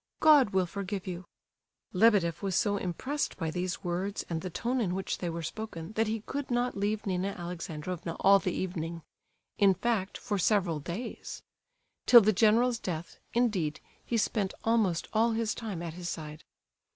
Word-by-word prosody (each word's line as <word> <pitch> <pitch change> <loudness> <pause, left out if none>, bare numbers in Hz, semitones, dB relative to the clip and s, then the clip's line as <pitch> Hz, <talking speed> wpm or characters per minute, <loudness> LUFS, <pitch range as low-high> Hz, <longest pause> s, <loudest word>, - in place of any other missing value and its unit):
God 295 -7 +7
will 190 -2 +2
forgive 195 +1 -4
you!" 180 -1 -5 0.7
Lebedeff 185 -5 +4
was 195 -3 -1
so 205 +2 +2
impressed 260 - -2
by 160 -1 -2
these 180 +1 -3
words, 185 +3 -2
and 160 -1 -1
the 185 - -4
tone 240 +8 -1
in 185 -5 0
which 190 0 -3
they 175 - -2
were 165 0 -4
spoken, 170 -1 -6
that 220 +1 +1
he 220 0 -2
could 280 +5 -4
not 245 0 0
leave 205 +2 -1
Nina 190 0 -1
Alexandrovna 170 -1 -5
all 195 +1 +6
the 185 - -1
evening—in 175 +3 -2
fact, 200 -1 -1
for 205 -4 -2
several 180 -5 +2
days. 180 - -6 0.6
Till 240 -2 +10
the 215 +1 +3
general's 230 +4 +4
death, 170 -4 -5 0.2
indeed, 200 -11 +1 0.2
he 235 - -1
spent 210 -3 0
almost 215 -7 +2
all 225 +1 +3
his 225 -1 0
time 205 -7 -5
at 165 -2 -5
his 175 0 -5
side. 155 -2 -7
190 Hz, 165 wpm, -30 LUFS, 175-220 Hz, 0.7 s, Till